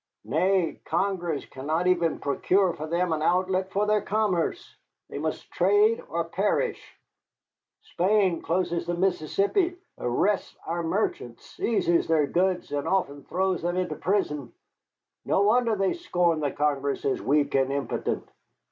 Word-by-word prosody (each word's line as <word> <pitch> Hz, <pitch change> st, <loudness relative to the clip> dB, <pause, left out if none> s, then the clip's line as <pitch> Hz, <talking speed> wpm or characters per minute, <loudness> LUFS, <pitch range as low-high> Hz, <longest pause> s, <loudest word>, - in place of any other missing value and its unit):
Nay, 185 Hz, -2 st, +1 dB
Congress 175 Hz, -3 st, -1 dB
cannot 155 Hz, +6 st, -2 dB
even 170 Hz, -3 st, +2 dB
procure 180 Hz, +6 st, +1 dB
for 155 Hz, -, -6 dB
them 170 Hz, +1 st, 0 dB
an 155 Hz, -, -2 dB
outlet 185 Hz, +3 st, +1 dB
for 205 Hz, +1 st, +1 dB
their 210 Hz, 0 st, +2 dB
commerce. 205 Hz, -, -1 dB, 0.4 s
They -, -, -4 dB
must -, -, -4 dB
trade 440 Hz, +3 st, +3 dB
or -, -, -1 dB
perish. -, -, -2 dB, 0.9 s
Spain 190 Hz, -, +1 dB
closes 170 Hz, 0 st, -1 dB
the 175 Hz, -, -1 dB
Mississippi, 195 Hz, -, +1 dB, 0.2 s
arrests 185 Hz, +12 st, 0 dB
our 170 Hz, +1 st, -2 dB
merchants, 165 Hz, -, -2 dB
seizes 175 Hz, -7 st, 0 dB
their 160 Hz, -2 st, +3 dB
goods, 180 Hz, +3 st, 0 dB
and 145 Hz, -1 st, -2 dB
often 145 Hz, -7 st, -1 dB
throws 185 Hz, 0 st, 0 dB
them 175 Hz, +2 st, -1 dB
into 185 Hz, -1 st, -1 dB
prison. 150 Hz, -, -1 dB, 0.7 s
No 195 Hz, -, +2 dB
wonder 230 Hz, +2 st, +3 dB
they 195 Hz, -1 st, +1 dB
scorn 175 Hz, -, 0 dB
the 145 Hz, -2 st, 0 dB
Congress 140 Hz, -1 st, -1 dB
as 135 Hz, -, 0 dB
weak 145 Hz, +1 st, +1 dB
and 135 Hz, 0 st, +2 dB
impotent." 140 Hz, 0 st, -2 dB
180 Hz, 140 wpm, -26 LUFS, 155-195 Hz, 0.9 s, trade